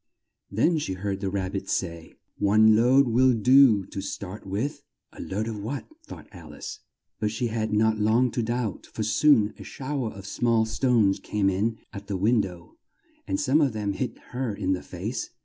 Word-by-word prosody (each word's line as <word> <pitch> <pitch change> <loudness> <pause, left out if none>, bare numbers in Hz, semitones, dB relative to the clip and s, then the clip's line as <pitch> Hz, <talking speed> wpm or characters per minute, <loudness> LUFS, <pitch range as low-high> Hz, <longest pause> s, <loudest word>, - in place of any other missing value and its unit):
Then 155 - +2
she 95 - -3
heard 95 +1 -3
the 95 -1 -2
Rab 95 -1 -2
bit 95 - -5
say, 85 -3 -3 0.2
"One 110 +2 +5
load 130 +5 +5
will 125 +2 +4
do 120 -3 +5
to 95 - -6
start 100 +1 -7
with." 105 +10 -3 0.3
"A - - -9
load 105 +4 -3
of 110 -2 -4
what?" 130 +7 -4 0.2
thought - - -10
Al 80 -6 -12
ice, - - -7 0.4
but 105 - 0
she 115 +2 -2
had 110 -1 -2
not 110 +1 +2
long 115 +4 +3
to 120 - -1
doubt, 120 -2 -3
for 110 - -3
soon 110 0 +4
a - - -8
show 135 -2 -4
er - - -3
of 100 -1 -11
small 115 +2 +1
stones 110 -3 +2
came 100 -2 0
in 110 +4 -1 0.2
at 100 0 -8
the 100 - -2
win 110 +4 +3
dow, 90 -3 -9 0.5
and 290 - -1
some 160 - +3
of 135 -5 +2
them 105 -2 -2
hit 125 +5 -4
her 125 -4 -3
in 95 -2 0
the 90 - -3
face. - - -5
110 Hz, 200 wpm, -26 LUFS, 100-125 Hz, 0.5 s, One